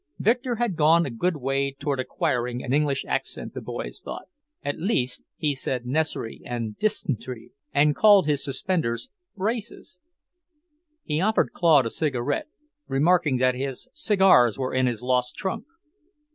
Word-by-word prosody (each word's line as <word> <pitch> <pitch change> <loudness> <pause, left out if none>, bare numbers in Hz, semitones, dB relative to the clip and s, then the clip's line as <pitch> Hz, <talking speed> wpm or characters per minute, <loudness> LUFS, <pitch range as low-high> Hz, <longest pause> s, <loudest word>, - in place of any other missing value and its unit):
Victor 245 +2 +1
had 235 -5 -1
gone 165 +2 +5
a 135 - -4
good 165 +8 -1
way 135 0 -1
toward 140 -1 -2
acquiring 125 -1 -1
an 125 - -2
English 145 -2 +1
accent, - - -3
the - - -6
boys - - -6
thought. - - -7 0.4
At 145 - -3
least 145 - 0 0.2
he 150 -2 0
said 130 -2 -3
'necess'ry' 140 -3 -2
and 115 -3 -4
'dysent'ry' 130 - -1 0.2
and 145 +1 +3
called 205 -5 +6
his 145 -2 +1
suspenders 140 - -2 0.3
'braces'. 210 -2 -4 1.0
He 150 +1 -1
offered 215 +3 +2
Claude 155 -7 +4
a 115 - -2
cigarette, 140 -3 -1 0.4
remarking 150 0 +2
that 130 0 +3
his 135 - -4
cigars 190 - +4
were 130 -1 -2
in 130 0 +2
his 120 -1 -3
lost 125 0 0
trunk. 190 -2 -4
140 Hz, 145 wpm, -25 LUFS, 125-180 Hz, 1.0 s, called